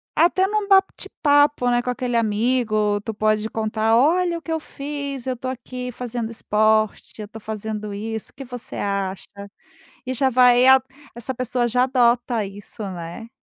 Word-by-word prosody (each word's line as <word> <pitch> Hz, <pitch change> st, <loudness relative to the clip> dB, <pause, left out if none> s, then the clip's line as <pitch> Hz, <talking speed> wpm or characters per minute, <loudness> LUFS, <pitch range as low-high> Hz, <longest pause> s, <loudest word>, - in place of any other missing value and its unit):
Até 355 Hz, +4 st, +3 dB
no 420 Hz, 0 st, -1 dB
bate-papo, 290 Hz, -8 st, +3 dB
né, 240 Hz, 0 st, +2 dB
com 250 Hz, -, -4 dB
aquele 245 Hz, -1 st, -1 dB
amigo, 215 Hz, -1 st, +1 dB
tu 225 Hz, +2 st, -5 dB
pode 215 Hz, 0 st, +1 dB
contar: 220 Hz, 0 st, 0 dB
"Olha 340 Hz, +7 st, +3 dB
o -, -, -9 dB
que 330 Hz, -, -7 dB
eu 320 Hz, -, 0 dB
fiz, 280 Hz, -3 st, -6 dB
eu 255 Hz, -2 st, -2 dB
tô 255 Hz, -, -6 dB
aqui 250 Hz, 0 st, -5 dB
fazendo 240 Hz, -1 st, -4 dB
esporte. 215 Hz, 0 st, 0 dB
Eu 210 Hz, -, -6 dB
tô 225 Hz, +2 st, -11 dB
fazendo 215 Hz, -1 st, -5 dB
isso, 220 Hz, +2 st, -5 dB
o -, -, -44 dB
que 275 Hz, -, -8 dB
você 245 Hz, -2 st, -7 dB
acha?". 195 Hz, -1 st, -2 dB, 0.8 s
E 255 Hz, -, -3 dB
já 265 Hz, +1 st, +2 dB
vai 250 Hz, -1 st, +5 dB
ia 265 Hz, 0 st, +7 dB, 0.3 s
Essa 240 Hz, +3 st, -3 dB
pessoa 250 Hz, 0 st, -1 dB
já 250 Hz, +2 st, +2 dB
adota 240 Hz, -3 st, +2 dB
isso, 200 Hz, +2 st, -9 dB
né? 175 Hz, +5 st, -8 dB
240 Hz, 170 wpm, -22 LUFS, 215-260 Hz, 0.8 s, ia